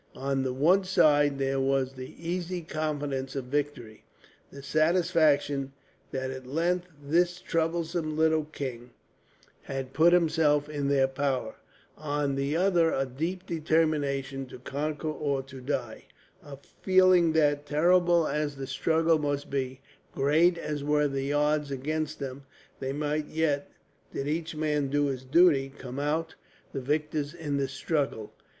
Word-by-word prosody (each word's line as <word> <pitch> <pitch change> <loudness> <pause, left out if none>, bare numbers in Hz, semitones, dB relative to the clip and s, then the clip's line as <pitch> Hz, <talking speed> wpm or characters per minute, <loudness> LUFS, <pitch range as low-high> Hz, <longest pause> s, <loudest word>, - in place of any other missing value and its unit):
On 135 0 -1
the 130 -1 -1
one 165 +10 +3
side 150 -6 +3
there 135 0 0
was 135 0 +1
the 130 -1 -9
easy 175 +1 -3
confidence 145 -4 -3
of 135 -2 -3
victory, 130 -5 -3 0.5
the 140 0 -11
satisfaction 150 -3 +2 0.4
that 130 0 -3
at 130 -1 -8
length 175 +5 0 0.2
this 175 +4 +1
troublesome 165 -1 -1
little 160 -1 +3
king 130 -5 -6 0.7
had 135 -1 -5
put 165 +2 +5
himself 160 -4 +3
in 145 -2 -3
their 135 -1 +3
power; 135 -4 -2 0.4
on 145 -2 -1
the 140 +2 -1
other 175 -3 +3
a 135 - 0
deep 165 +8 -4
determination 145 -4 0
to - - -10
conquer 150 +5 -4
or 145 -3 -1
to 135 -1 -11
die, 125 -4 -4 0.4
a 145 -5 -10 0.2
feeling 185 -3 +5
that, 145 -2 +2
terrible 170 +2 +3
as 150 -1 -1
the 135 -1 -5
struggle 160 +4 +2
must 145 -1 -2
be, 130 -1 -3 0.3
great 160 +6 +3
as 150 -3 -4
were 150 0 +2
the 135 0 -2
odds 150 0 +1
against 155 +3 -3
them, 135 0 -6 0.4
they 135 0 -3
might 150 +1 -2
yet, 150 -3 0 0.4
did 135 - -4
each 160 +2 -2
man 150 -2 0
do 145 +1 +1
his 130 -2 -3
duty, 140 -1 +4
come 130 +1 -7
out 160 +3 -1 0.4
the 135 - -3
victors 150 +2 -2
in 150 -4 -3
the 140 -1 0
struggle. 135 -4 -2
145 Hz, 145 wpm, -28 LUFS, 135-160 Hz, 0.7 s, put